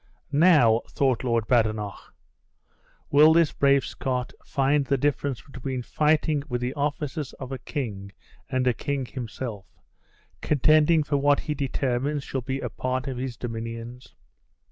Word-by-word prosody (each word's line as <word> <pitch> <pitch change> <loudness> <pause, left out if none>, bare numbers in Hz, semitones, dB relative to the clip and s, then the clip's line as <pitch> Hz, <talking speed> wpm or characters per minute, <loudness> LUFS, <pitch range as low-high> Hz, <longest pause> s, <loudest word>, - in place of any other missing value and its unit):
"Now," 145 -8 +5
thought 130 -3 +1
Lord 115 -3 +1
Badenoch, 110 -4 -1 1.0
"will 150 +2 +7
this 165 -2 +3
brave 140 -1 +3
Scot 125 -1 -3
find 140 +1 +1
the 140 0 0
difference 140 -1 -1
between 130 -1 -5
fighting 150 +1 +1
with 125 -1 -1
the 125 +2 -2
officers 145 0 -3
of 130 -1 -8
a 135 - -4
king 105 -8 -5 0.4
and 130 -1 0
a 125 - +3
king 140 +2 -3
himself, 115 -4 -6 0.7
contending 155 +2 +4
for 145 0 0
what 145 +1 +3
he 150 - -3
determines 140 0 -1
shall 135 - -3
be 135 +2 -3
a - - -3
part 130 +1 -2
of 130 -2 -4
his 125 -2 -4
dominions!" 115 +1 -7
130 Hz, 145 wpm, -25 LUFS, 120-145 Hz, 1.0 s, will